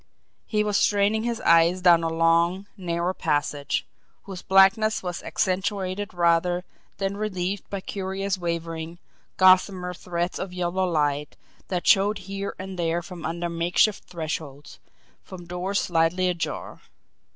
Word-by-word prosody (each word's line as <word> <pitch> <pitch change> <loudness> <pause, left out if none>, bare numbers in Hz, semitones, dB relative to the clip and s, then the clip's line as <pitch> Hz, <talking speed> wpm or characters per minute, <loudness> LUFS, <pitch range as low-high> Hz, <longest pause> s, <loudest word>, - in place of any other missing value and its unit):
He 210 -1 +1
was 210 -1 +1
straining 210 +2 +2
his 235 -1 -2
eyes 170 +2 +4
down 175 -2 +5
a 165 - 0
long, 165 +3 +2
narrow 175 -2 -2
passage, 145 -3 -1 0.4
whose 190 -2 -8
blackness 195 +3 +4
was 180 -1 -4
accentuated 195 +1 -2
rather 175 +1 +2 0.3
than 195 0 -2
relieved 195 -2 -3
by 200 -1 -4
curious 195 0 -3
wavering, 170 -1 -4 0.4
gossamer 185 -1 +4
threads 175 0 -3
of 190 -1 -5
yellow 180 +1 -1
light 150 -2 -1 0.3
that 180 -2 -3
showed 200 +2 +4
here 195 0 -5
and 190 -1 -7
there 170 0 0
from 175 -1 -9
under 170 +1 -3
makeshift 170 +5 +1
thresholds, 155 -4 -6 0.4
from 180 -2 -11
doors 180 +3 -2
slightly 175 +2 +1
ajar. 175 -1 -4
180 Hz, 130 wpm, -25 LUFS, 170-195 Hz, 0.4 s, down